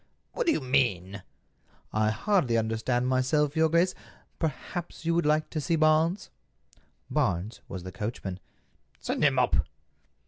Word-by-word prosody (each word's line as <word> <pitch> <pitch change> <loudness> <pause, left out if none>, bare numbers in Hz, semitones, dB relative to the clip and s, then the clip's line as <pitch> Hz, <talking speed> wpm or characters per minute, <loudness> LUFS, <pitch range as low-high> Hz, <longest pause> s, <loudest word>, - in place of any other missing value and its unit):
"What - - -2
do - - +6
you - - 0
mean?" 105 -8 0 0.7
"I 110 0 +2
hardly 135 - +1
understand 115 +3 0
myself, 135 +4 +1
your 160 0 +3
grace. 170 +3 +3 0.5
Perhaps 165 +3 -4
you 165 - +2
would 170 -2 +1
like 155 +1 +1
to 155 - -2
see 165 +3 +1
Barnes." 160 +4 +2 0.8
Barnes 90 +6 -1
was 90 -2 -6
the 95 - -7
coachman. 95 -1 -5 0.6
"Send - - -2
him - - +4
up." - - +2
135 Hz, 140 wpm, -28 LUFS, 110-160 Hz, 0.8 s, do